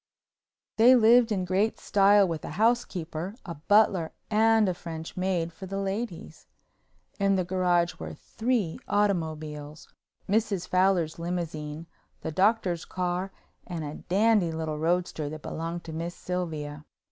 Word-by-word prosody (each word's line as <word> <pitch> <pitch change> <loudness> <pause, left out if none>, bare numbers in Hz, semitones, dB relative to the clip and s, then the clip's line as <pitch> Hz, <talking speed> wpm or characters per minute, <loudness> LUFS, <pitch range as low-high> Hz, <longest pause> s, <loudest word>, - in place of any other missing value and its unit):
They 240 +3 +7
lived 235 0 +5
in 190 -3 0
great 195 +5 +1
style 200 0 +4
with 165 -3 -4
a - - -5
housekeeper, 195 -6 0
a 170 - -5
butler 185 0 +2 0.2
and 220 0 +4
a 185 - +1
French 165 -2 -7
maid 180 -3 -1
for 190 - -9
the 195 +1 -4
ladies. 195 -1 -4 0.7
In 195 0 +3
the 185 - +1
garage 175 -2 +1
were - - -6
three 225 -8 -2
automobiles, 155 -7 -2 0.3
Mrs. 205 -3 0
Fowler's 185 -4 +2
limousine, 165 -3 -4 0.4
the - - -4
Doctor's 185 -1 +1
car 180 +1 -2 0.4
and 170 -3 -4
a 145 0 -5 0.2
dandy 205 -2 +3
little 160 -1 -3
roadster 165 -2 0
that 155 0 -8
belonged 165 +1 -4
to 160 - -8
Miss 170 +2 -4
Sylvia. 155 -5 -4
180 Hz, 135 wpm, -27 LUFS, 160-200 Hz, 0.7 s, They